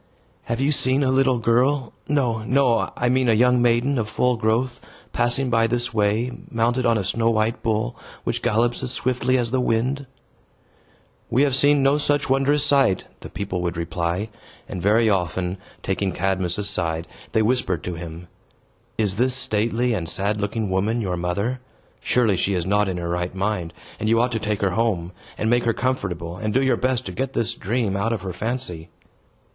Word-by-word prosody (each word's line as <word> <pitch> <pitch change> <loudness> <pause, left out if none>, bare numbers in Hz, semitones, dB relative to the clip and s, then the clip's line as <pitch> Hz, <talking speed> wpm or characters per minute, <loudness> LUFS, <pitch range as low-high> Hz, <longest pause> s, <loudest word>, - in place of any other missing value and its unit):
"Have 115 - -2
you 140 +2 +2
seen 135 -1 +2
a 130 - +2
little 130 -1 +3
girl 125 +3 +1
no, 125 -7 +1
no, 120 -3 +2
I 120 - +1
mean 130 0 +2
a - - +5
young 125 +2 +4
maiden 120 +3 +2
of 110 -1 -2
full 125 +3 +1
growth 115 +3 0 0.3
passing 125 +2 0
by 115 0 +3
this 120 0 -1
way, 110 +3 +1 0.2
mounted 120 +2 +1
on 115 -1 +3
a 105 - -1
snow 115 +5 +1
white 110 +1 0
bull, 115 +1 -1 0.3
which - - -2
gallops 120 +3 +1
as 125 - -2
swiftly 130 +1 +1
as 120 -2 -1
the 130 0 +1
wind?" 130 +4 0 1.2
"We 125 +4 +3
have 140 -3 +2
seen 145 +1 +4
no 140 +2 +3
such 145 -2 0
wondrous 135 +2 +3
sight," 135 -10 +3 0.2
the - - -9
people 95 -3 -4
would 85 -1 -2
reply; 85 +4 -2 0.4
and 90 - -5
very 110 +4 +3
often, 90 -1 0 0.2
taking 95 -1 -1
Cadmus 95 -1 0
aside, 95 -5 -1 0.3
they 110 - +3
whispered 105 -9 0
to 90 - -4
him, 85 0 -8 0.7
"Is 100 -3 0
this 125 +2 +3
stately 115 0 +1
and 85 -6 -2
sad 105 +2 -1
looking 105 0 -2
woman 105 +5 +1
your 90 -4 -1
mother? 100 +9 -2 0.4
Surely 115 -6 +2
she 100 +2 0
is 90 -2 -1
not 105 +1 +2
in 95 -2 -2
her 85 -1 -3
right 90 +1 -2
mind; 95 -3 -1 0.3
and 110 - -1
you 115 0 +4
ought 120 +1 +2
to 115 - -1
take 105 -1 -2
her 100 -2 +2
home, 95 -4 0 0.3
and 110 - -1
make 120 +1 +3
her 115 - +2
comfortable, 90 -10 -2
and 105 +3 -3
do 130 - +4
your 130 - +3
best 130 -1 0
to - - -5
get 135 0 -3
this 115 0 0
dream 110 -2 -1
out 100 +4 0
of 110 -5 -2
her 95 -1 -4
fancy." 110 -5 -4
115 Hz, 190 wpm, -23 LUFS, 95-125 Hz, 1.2 s, a